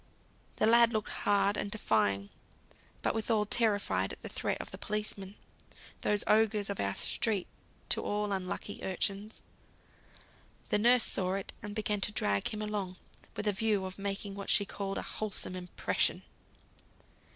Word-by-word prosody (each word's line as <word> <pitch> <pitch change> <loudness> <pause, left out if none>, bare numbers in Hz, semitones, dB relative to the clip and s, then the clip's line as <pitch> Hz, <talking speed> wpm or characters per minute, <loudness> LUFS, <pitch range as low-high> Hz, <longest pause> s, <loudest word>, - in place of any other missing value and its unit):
The - - +2
lad 235 +1 +6
looked 215 -1 -1
hard 200 0 +2
and 205 - -1
defying; 100 - +1 0.7
but - - +2
withal 220 -1 +1
terrified 205 - +1
at - - -9
the - - -6
threat - - -2
of - - -7
the - - -9
policeman, 205 -2 -3 0.7
those 210 0 +2
ogres 215 -2 +3
of 200 - -5
our 100 0 0
streets 210 -5 +2 0.4
to - - +6
all 210 0 -1
unlucky 190 +1 -3
urchins. 195 +3 -2 1.3
The 210 - +2
nurse 240 +2 +5
saw 185 0 +2
it, 195 - -4
and 205 0 -6
began 210 -2 0
to 210 - +1
drag 100 - +1
him 215 0 -3
along, 205 -3 -3 0.4
with 210 - -3
a 205 - +3
view 205 -1 +1
of 185 +1 -7
making 200 0 -3
what 200 0 -6
she 200 - +4
called 195 0 -4
"a - - -3
wholesome 205 -3 -2
impression." 180 -1 -1
205 Hz, 155 wpm, -32 LUFS, 190-215 Hz, 1.3 s, lad